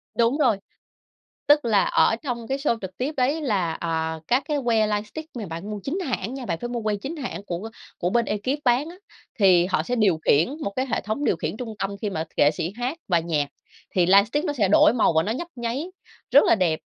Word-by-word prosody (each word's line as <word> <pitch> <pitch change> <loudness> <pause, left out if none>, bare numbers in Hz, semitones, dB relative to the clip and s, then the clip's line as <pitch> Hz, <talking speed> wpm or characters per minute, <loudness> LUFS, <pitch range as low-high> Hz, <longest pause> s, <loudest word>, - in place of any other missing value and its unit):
Đúng 235 +5 +2
rồi, 240 -9 +3 0.9
tức 295 -2 +5
là 210 -4 +3
ở - - +3
trong 235 -2 -5
cái 270 - -1
show 275 -4 0
trực 190 -1 -7
tiếp 270 +5 -2
ấy 275 +5 +1
là, 195 - 0
ờ, 160 -1 -2
các 255 +3 +2
cái 300 -2 0
que 225 -3 +3
lightstick 215 +10 -4
mà 225 -4 -4
bạn 170 +5 -6
mua 210 - -4
chính 320 +8 -2
hãng 255 - -3
nha, 265 -2 -6
bạn 170 -6 -2
phải 240 - -4
mua 240 -1 -3
que 215 -1 0
chính 270 +11 -6
hãng 245 -9 -5
của 185 +4 -5 0.3
của 175 - 0
bên 235 +4 +2
ekip 255 +8 -2
bán 255 +5 +2
á, 345 - -11 0.4
thì 185 -4 +5
họ 185 - 0
sẽ 250 - -2
điều 205 -8 +3
khiển 155 +8 +4
một 200 - -2
cái 260 - 0
hệ - - 0
thống 215 +7 -3
điều - - +2
khiển - - -4
trung 230 -2 -5
tâm, 200 +1 -3
khi 210 - -1
mà 160 -5 -3
nghệ 145 - +5
sĩ 160 +4 -4
hát 250 +6 -3
bài 170 -3 +2
nhạc, 155 -4 0 0.5
thì 180 -2 +4
lightstick 205 - +4
nó 295 - -1
sẽ 215 -8 +1
đổi 210 - +6
màu 230 - +3
và 160 0 +3
nó 210 - -2
nhấp 325 +8 -4
nháy, 240 +5 -3 0.5
rất 285 - +7
là - - +4
đẹp. 170 -6 +1
225 Hz, 240 wpm, -24 LUFS, 190-260 Hz, 0.9 s, rất